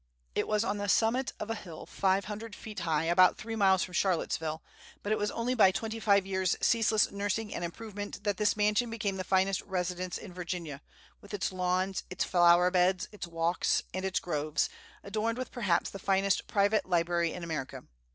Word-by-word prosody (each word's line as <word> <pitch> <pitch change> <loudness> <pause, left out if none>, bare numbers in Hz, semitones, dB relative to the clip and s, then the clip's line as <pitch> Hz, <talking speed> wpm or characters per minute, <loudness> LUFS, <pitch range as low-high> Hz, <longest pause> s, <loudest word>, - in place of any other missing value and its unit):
It - - -1
was 210 0 +1
on 205 -2 -2
the 205 0 -2
summit 240 +6 +2
of 215 +1 -4
a - - +1
hill 175 -7 -9
five 195 0 +1
hundred 215 +1 -6
feet 215 -3 -8
high, 160 -3 0
about 175 +2 +5
three 225 +1 -5
miles 190 -4 +4
from 180 - -7
Charlottesville; 160 -3 -1 0.4
but 205 - -2
it 215 - +2
was 210 - 0
only 235 +2 -1
by 220 -6 +6
twenty 220 +4 -3
five 200 -3 +3
years' 190 -2 0
ceaseless 225 -2 +3
nursing 205 +2 -2
and - - -4
improvement 205 +2 -6
that 205 -2 0
this 210 -1 +2
mansion 210 +3 +2
became 210 -4 -2
the 185 - -3
finest 190 +1 +1
residence 180 -1 -3
in 180 - -10
Virginia, 170 -5 -5 0.4
with 205 +1 -7
its 195 - -1
lawns, 185 +1 -1
its 180 - -1
flower 175 0 +5
beds, 180 0 +2
its 210 -4 -7
walks, 165 +1 0
and 185 +1 -3
its 190 +1 0
groves, 155 -2 -1 0.3
adorned 220 +3 -2
with 255 - -5
perhaps 195 -9 0
the 195 - -8
finest 195 0 +1
private 205 +1 +2
library 170 -1 +1
in 180 - -7
America. 160 -5 -5
190 Hz, 190 wpm, -30 LUFS, 175-210 Hz, 0.4 s, by